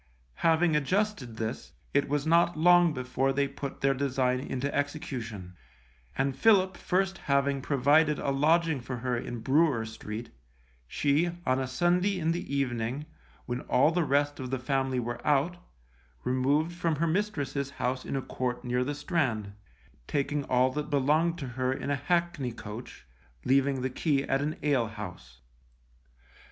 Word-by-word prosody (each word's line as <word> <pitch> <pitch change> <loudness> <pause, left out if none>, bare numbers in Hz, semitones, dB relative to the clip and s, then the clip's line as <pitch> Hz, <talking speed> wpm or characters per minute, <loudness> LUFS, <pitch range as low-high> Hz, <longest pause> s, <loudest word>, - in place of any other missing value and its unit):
Having 165 -1 +3
adjusted 150 - 0
this, 110 +1 -4 0.2
it 145 0 +2
was 145 0 0
not 170 +1 +3
long 175 +1 +6
before 130 0 -1
they 140 +1 +1
put 140 0 -7
their 135 0 +3
design 130 -2 0
into 135 +1 -3
execution, 120 - -4 0.6
and 135 0 0
Philip 190 +2 +4
first 190 0 0
having 140 0 +1
provided 145 +3 +3
a 140 - -1
lodging 160 +1 +2
for 125 +1 -5
her 125 +1 -1
in 120 0 -5
Brewer 135 -2 +2
Street, 110 +1 -7 0.6
she, 145 - +1 0.2
on 130 +1 +2
a 130 - -2
Sunday 180 +8 +1
in 165 -1 +1
the 170 -4 -4
evening, 130 0 -1 0.4
when 125 +1 -3
all 135 +5 +3
the 175 0 +1
rest 145 0 +1
of 130 -1 -5
the 130 - -1
family 130 0 0
were 120 0 -4
out, 150 +4 +2 0.7
removed 140 +6 +1
from 170 -2 0
her 160 +3 0
mistress's 160 -7 -1
house 130 -2 -2
in - - -4
a 135 - -2
court 125 -1 -3
near 125 +1 +1
the 145 +3 -3
Strand, 130 - -1 0.5
taking 145 +1 -1
all 130 +1 +3
that 150 +2 -4
belonged 155 +4 +2
to 140 -6 -5
her 130 +1 -1
in 135 +2 -3
a - - +2
hackney 170 -4 0
coach, 110 +1 -9 0.4
leaving 135 0 +2
the 130 - 0
key 140 0 +1
at 135 0 0
an 150 +2 -2
alehouse. 105 - -2
140 Hz, 155 wpm, -29 LUFS, 125-155 Hz, 0.7 s, long